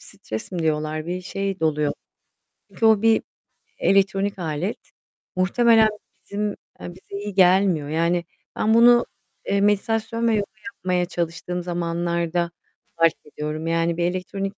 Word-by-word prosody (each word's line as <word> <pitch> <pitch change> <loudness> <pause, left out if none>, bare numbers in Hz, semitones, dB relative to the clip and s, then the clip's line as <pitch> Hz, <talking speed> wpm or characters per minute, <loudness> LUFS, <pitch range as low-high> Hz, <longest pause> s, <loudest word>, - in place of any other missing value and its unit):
stres 110 - -8
mi 180 - -3
diyorlar? 155 0 -1
Bir 180 +1 -3
şey 195 0 -4
doluyor. 150 -2 +1 0.8
Çünkü 225 - -2
o 220 -2 +5
bir, 225 0 +4 0.6
elektronik 195 0 +2
alet. 165 +4 -2 0.6
Muhtemelen 220 +4 +4 0.4
bizim 210 +1 -2 0.3
eee, - - -7
bize 190 +1 -11
iyi 205 -1 -5
gelmiyor. 185 -5 +4
Yani, 170 +2 +1 0.3
ben 220 - +2
bunu, 240 +1 +6 0.4
eee, 200 0 +1
meditasyon 225 +3 +1
ve 230 - +3
yoga 205 -1 -2 0.2
yapmaya 180 -3 -1
çalıştığım 175 0 -3
zamanlarda 170 0 -1 0.5
fark 165 -1 +4
ediyorum. 150 +2 -5
Yani 165 0 +1
bir 175 - 0
elektronik 195 +2 -3
180 Hz, 130 wpm, -23 LUFS, 165-200 Hz, 0.8 s, bunu